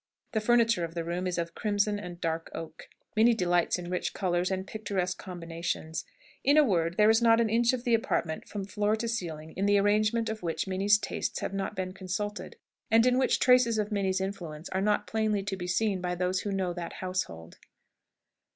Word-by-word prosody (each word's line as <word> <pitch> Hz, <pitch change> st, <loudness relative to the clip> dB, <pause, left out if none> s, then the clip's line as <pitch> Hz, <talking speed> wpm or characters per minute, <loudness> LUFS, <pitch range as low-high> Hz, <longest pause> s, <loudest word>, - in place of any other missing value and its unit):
The 220 Hz, -, 0 dB
furniture 230 Hz, -4 st, +3 dB
of 165 Hz, 0 st, -5 dB
the 170 Hz, -, -2 dB
room 175 Hz, +2 st, -2 dB
is 180 Hz, -, -2 dB
of 170 Hz, -1 st, -2 dB
crimson 205 Hz, -1 st, 0 dB
and 175 Hz, -3 st, -8 dB
dark 165 Hz, -1 st, -2 dB
oak. 165 Hz, 0 st, -8 dB, 0.3 s
Minnie 230 Hz, +2 st, +5 dB
delights 175 Hz, -4 st, +2 dB
in 175 Hz, -1 st, -6 dB
rich 180 Hz, -, -2 dB
colours 180 Hz, -1 st, 0 dB
and 190 Hz, 0 st, -2 dB
picturesque 195 Hz, -4 st, -3 dB
combinations. 165 Hz, -3 st, -4 dB, 0.4 s
In 285 Hz, +2 st, +4 dB
a 305 Hz, -, +8 dB
word, 170 Hz, -, +1 dB
there 215 Hz, +1 st, +6 dB
is 225 Hz, +1 st, +3 dB
not 230 Hz, -1 st, +5 dB
an 225 Hz, -2 st, +2 dB
inch 235 Hz, +1 st, +4 dB
of 255 Hz, -2 st, -3 dB
the 240 Hz, -2 st, +1 dB
apartment, 170 Hz, -8 st, 0 dB
from 200 Hz, -2 st, -4 dB
floor 210 Hz, +2 st, 0 dB
to 230 Hz, +1 st, -3 dB
ceiling, 160 Hz, -8 st, -4 dB
in 195 Hz, +2 st, 0 dB
the 205 Hz, 0 st, +5 dB
arrangement 215 Hz, +3 st, +2 dB
of 220 Hz, 0 st, -4 dB
which 165 Hz, -2 st, -2 dB
Minnie's 195 Hz, +2 st, +3 dB
tastes -, -, -3 dB
have -, -, -3 dB
not 195 Hz, +1 st, -3 dB
been 185 Hz, -1 st, -3 dB
consulted, 195 Hz, +2 st, -4 dB, 0.3 s
and 225 Hz, +2 st, +5 dB
in 250 Hz, 0 st, +3 dB
which 265 Hz, -, +3 dB
traces 250 Hz, -3 st, +5 dB
of 210 Hz, 0 st, -1 dB
Minnie's 190 Hz, -2 st, 0 dB
influence 175 Hz, -5 st, -5 dB
are 190 Hz, -, -1 dB
not 210 Hz, +1 st, +1 dB
plainly 215 Hz, -2 st, 0 dB
to 195 Hz, 0 st, -3 dB
be 180 Hz, -1 st, -5 dB
seen 195 Hz, 0 st, 0 dB
by 180 Hz, 0 st, -2 dB
those 180 Hz, +1 st, 0 dB
who 205 Hz, -, -3 dB
know 190 Hz, -2 st, -1 dB
that 170 Hz, -1 st, -6 dB
household. 180 Hz, -, -4 dB
195 Hz, 205 wpm, -29 LUFS, 175-220 Hz, 0.4 s, a